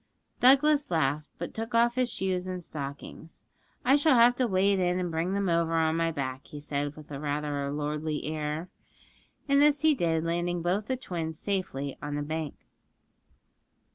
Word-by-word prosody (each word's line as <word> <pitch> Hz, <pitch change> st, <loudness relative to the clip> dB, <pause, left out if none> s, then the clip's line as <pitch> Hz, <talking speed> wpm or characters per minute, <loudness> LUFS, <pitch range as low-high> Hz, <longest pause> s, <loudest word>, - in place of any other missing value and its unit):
Douglas 280 Hz, +3 st, +5 dB
laughed, 150 Hz, -3 st, 0 dB
but -, -, -5 dB
took 225 Hz, +1 st, -4 dB
off 235 Hz, +1 st, +4 dB
his 250 Hz, -1 st, 0 dB
shoes 185 Hz, -1 st, -1 dB
and 180 Hz, -1 st, -4 dB
stockings. 145 Hz, +2 st, -8 dB, 0.4 s
'I 270 Hz, +3 st, +6 dB
shall 290 Hz, -1 st, +4 dB
have 240 Hz, +1 st, +6 dB
to 255 Hz, -, +2 dB
wade 195 Hz, 0 st, +2 dB
in 180 Hz, 0 st, +1 dB
and 180 Hz, -2 st, -2 dB
bring 165 Hz, +4 st, -1 dB
them 200 Hz, -1 st, 0 dB
over 165 Hz, -1 st, +1 dB
on 160 Hz, 0 st, +2 dB
my 165 Hz, 0 st, +1 dB
back,' 130 Hz, -3 st, -4 dB
he 150 Hz, -, -8 dB
said, 145 Hz, 0 st, -3 dB
with 155 Hz, -1 st, -13 dB
rather 145 Hz, 0 st, -2 dB
a -, -, -3 dB
lordly 150 Hz, +1 st, -2 dB
air. 155 Hz, +2 st, -3 dB, 0.8 s
And 280 Hz, 0 st, +4 dB
this 295 Hz, -1 st, +4 dB
he 315 Hz, -1 st, +5 dB
did, 165 Hz, -, 0 dB
landing 175 Hz, +1 st, -1 dB
both 195 Hz, +5 st, 0 dB
the 260 Hz, -, -1 dB
twins 165 Hz, -9 st, -4 dB
safely 165 Hz, -9 st, -3 dB
on 150 Hz, -1 st, -4 dB
the 145 Hz, -, -2 dB
bank. 155 Hz, 0 st, -4 dB
165 Hz, 175 wpm, -28 LUFS, 150-205 Hz, 0.8 s, I